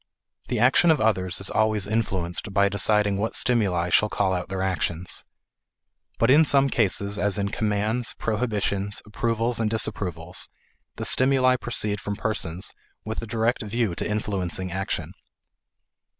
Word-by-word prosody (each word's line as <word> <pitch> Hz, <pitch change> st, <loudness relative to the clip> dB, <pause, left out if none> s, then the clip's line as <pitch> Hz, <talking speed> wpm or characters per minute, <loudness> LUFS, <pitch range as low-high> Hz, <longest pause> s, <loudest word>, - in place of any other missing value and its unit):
The 125 Hz, -, -2 dB
action 125 Hz, +9 st, +4 dB
of 160 Hz, -3 st, +4 dB
others 95 Hz, -5 st, +1 dB
is 100 Hz, -, 0 dB
always 110 Hz, -2 st, +1 dB
influenced 100 Hz, -3 st, -2 dB
by 100 Hz, 0 st, +3 dB
deciding 100 Hz, 0 st, +1 dB
what 110 Hz, +3 st, -2 dB
stimuli 95 Hz, -8 st, +1 dB
shall 105 Hz, -, +4 dB
call 95 Hz, -2 st, 0 dB
out 90 Hz, 0 st, -3 dB
their 95 Hz, -1 st, -2 dB
actions. 90 Hz, -2 st, -2 dB, 0.9 s
But 115 Hz, +2 st, +3 dB
in 150 Hz, +4 st, +7 dB
some 140 Hz, -2 st, +3 dB
cases 100 Hz, -3 st, 0 dB
as 100 Hz, 0 st, +1 dB
in 100 Hz, -1 st, -1 dB
commands, 110 Hz, +2 st, +1 dB
prohibitions, 105 Hz, -3 st, -2 dB
approvals, 115 Hz, +2 st, -1 dB
and 110 Hz, -1 st, +1 dB
disapprovals, 90 Hz, -6 st, -3 dB, 0.5 s
the -, -, -5 dB
stimuli 130 Hz, -1 st, +4 dB
proceed 105 Hz, -4 st, -2 dB
from 105 Hz, -, -4 dB
persons 95 Hz, -4 st, -3 dB, 0.3 s
with 110 Hz, 0 st, -4 dB
a 115 Hz, -, -7 dB
direct 115 Hz, +2 st, 0 dB
view 110 Hz, -2 st, -1 dB
to -, -, -4 dB
influencing 95 Hz, -3 st, -2 dB
action. 95 Hz, +2 st, -3 dB
105 Hz, 145 wpm, -24 LUFS, 95-115 Hz, 0.9 s, in